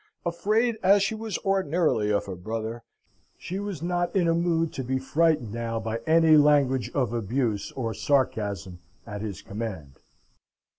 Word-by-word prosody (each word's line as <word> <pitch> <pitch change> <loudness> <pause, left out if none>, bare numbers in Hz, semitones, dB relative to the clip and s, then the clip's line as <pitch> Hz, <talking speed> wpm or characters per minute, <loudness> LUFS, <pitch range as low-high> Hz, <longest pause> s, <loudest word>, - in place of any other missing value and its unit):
Afraid 215 +7 +1
as 195 +1 +5
she 195 - 0
was 220 -2 -4
ordinarily 170 - +1
of 100 - +1
her 95 - -5
brother, 110 +5 -5 0.6
she 185 +2 -5
was 200 -6 -5
not 175 +2 -1
in 180 -3 +3
a 165 - +3
mood 165 -1 +1
to 130 - -4
be 130 +1 -1
frightened 140 -4 +1
now 115 -1 -2
by 110 +1 -3
any 160 -1 +6
language 145 -4 +3
of 125 -5 0
abuse 115 -1 -1
or 115 -4 -3
sarcasm 100 -10 -1 0.3
at 105 -2 -6
his 105 -3 -6
command. 100 -10 -6
135 Hz, 155 wpm, -26 LUFS, 110-170 Hz, 0.6 s, any